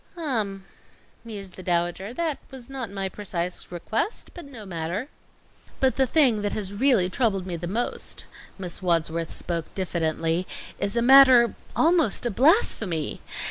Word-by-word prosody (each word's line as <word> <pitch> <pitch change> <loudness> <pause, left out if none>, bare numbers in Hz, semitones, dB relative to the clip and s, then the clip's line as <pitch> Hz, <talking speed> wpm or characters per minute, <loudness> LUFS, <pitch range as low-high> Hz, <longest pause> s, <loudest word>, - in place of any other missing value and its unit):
"Um," 215 - -2 0.6
mused 200 -5 -8
the - - -7
Dowager, 175 +3 -1
"that 315 +2 -2
was 265 -1 -11
not 260 -5 -4
my 195 -1 -3
precise 180 -3 -4
request, 220 - -3
but 350 - -9
no 235 -7 -10
matter." 180 - -4 0.7
"But 265 -1 +2
the 265 -1 +2
thing 250 -7 +4
that 205 0 -1
has 200 -2 -3
really 230 -4 +3
troubled 195 -1 0
me 180 -2 -3
the 170 +1 -5
most," 230 +7 -3 0.3
Miss 180 -2 -6
Wadsworth 165 -2 0
spoke 170 -2 -2
diffidently, 165 -1 -1 0.3
"is 200 +3 0
a 235 - +2
matter 255 -3 +8 0.2
almost 320 - +3
a 240 - 0
blasphemy. 220 - +2
200 Hz, 145 wpm, -25 LUFS, 180-255 Hz, 0.7 s, matter